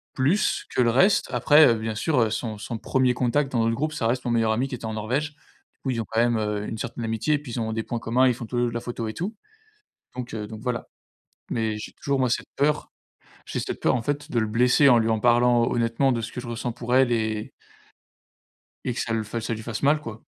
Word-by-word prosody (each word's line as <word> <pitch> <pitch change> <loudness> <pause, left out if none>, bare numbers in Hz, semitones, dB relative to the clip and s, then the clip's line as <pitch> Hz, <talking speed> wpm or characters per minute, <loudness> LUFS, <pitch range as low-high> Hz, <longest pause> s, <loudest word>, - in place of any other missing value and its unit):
plus 150 +11 +1
que - - +3
le 120 - +4
reste 185 - +3
après, 150 +1 +6
heu, 120 - +5
bien 110 0 -3
sûr, 145 +5 +1
heu, 115 -2 +3
son 110 0 -3
son 110 +2 -5
1er 130 +2 +1
contact 130 +3 +1
dans 120 - 0
notre 115 0 +1
groupe, 155 +5 -2
ça 125 -7 -1
reste 125 +2 -1
mon 120 - 0
meilleur 115 -1 +2
ami 120 +5 0
qui 130 - -5
était 120 - -12
en 110 - -3
Norvège, 130 +8 -2 0.5
où - - 0
ils 115 -2 -1
ont - - -5
quand 110 - 0
même, 120 0 +3
heu, 105 -1 -2
une 110 - -5
certaine 115 +1 -5
amitié 115 +7 +1
puis 140 -5 -9
ils 120 - -2
ont 110 0 -2
des 110 0 -2
points 120 - -4
communs, 125 +3 +3
ils 125 - +3
font 120 0 -7
tout 120 +2 -4
les 120 - +2
2 120 - +1
de - - -8
la 120 - -3
photo 120 -1 -4
et 110 - -4
tout 185 - -4 0.8
donc, 125 -1 -5
heu 105 -1 -4
donc, 110 0 -9
voilà. 125 -3 -2 0.7
Mais 110 -2 -1
j'ai 105 - -7
toujours 140 -1 -1
moi 130 -1 +2
cette 120 - -1
peur 150 +2 +1 0.6
j'ai - - -3
cette - - -5
peur - - +2
en 125 - -1
fait 145 +4 -3
de 120 - 0
le 110 - +2
blesser 125 +6 +4
en 120 -3 +6
lui 115 0 +1
en 110 -1 +1
parlant 120 0 +4
honnêtement 120 +3 +1
de 120 - -1
ce 115 - -6
que - - -5
je 120 - -9
ressens 120 +1 -3
pour 120 +1 -3
elle 130 -1 +4
et 110 -2 -1 1.3
et 125 - -1
que - - -3
ça 115 - -2
l 110 -1 0 0.2
ça 110 +1 -2
lui 110 - -5
fasse 110 +1 -5
mal, 150 +2 +3
quoi. 110 -5 -8
120 Hz, 265 wpm, -25 LUFS, 110-130 Hz, 1.3 s, après